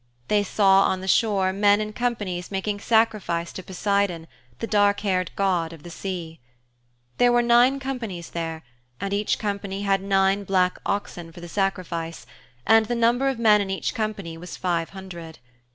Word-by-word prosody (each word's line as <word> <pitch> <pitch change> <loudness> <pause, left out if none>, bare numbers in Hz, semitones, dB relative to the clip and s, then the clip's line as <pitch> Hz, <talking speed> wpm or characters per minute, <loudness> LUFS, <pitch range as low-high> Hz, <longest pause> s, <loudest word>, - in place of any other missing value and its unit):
They 210 - +3
saw 195 -1 +4
on 185 - 0
the 190 - -7
shore 195 -2 +2
men 205 +1 +4
in 215 0 -4
companies 205 -7 -2
making 205 +1 -2
sacrifice 210 -7 +1
to - - -6
Poseidon, 190 -2 -1 0.3
the - - -3
dark 205 -1 +2
haired 185 -3 0
god 180 -4 0
of 160 -3 -13
the 175 - -9
sea. 170 -3 -6 0.8
There 245 0 +5
were 240 0 +3
nine 240 +3 +4
companies 230 -11 -5
there 165 -1 -4 0.4
and 200 0 -3
each 205 +1 0
company 200 -1 -3
had 195 -1 +2
nine 195 0 +2
black 185 -2 +1
oxen 175 -4 -3
for 170 - -12
the 175 - -8
sacrifice, 170 -5 -3 0.4
and 225 0 +5
the 240 - -1
number 240 +3 +2
of 265 - -2
men 215 -3 +5
in 195 - -3
each 190 - -2
company 200 -7 -4
was 180 +1 -8
five 170 -2 -1
hundred. 175 -4 -9
195 Hz, 170 wpm, -24 LUFS, 180-215 Hz, 0.8 s, There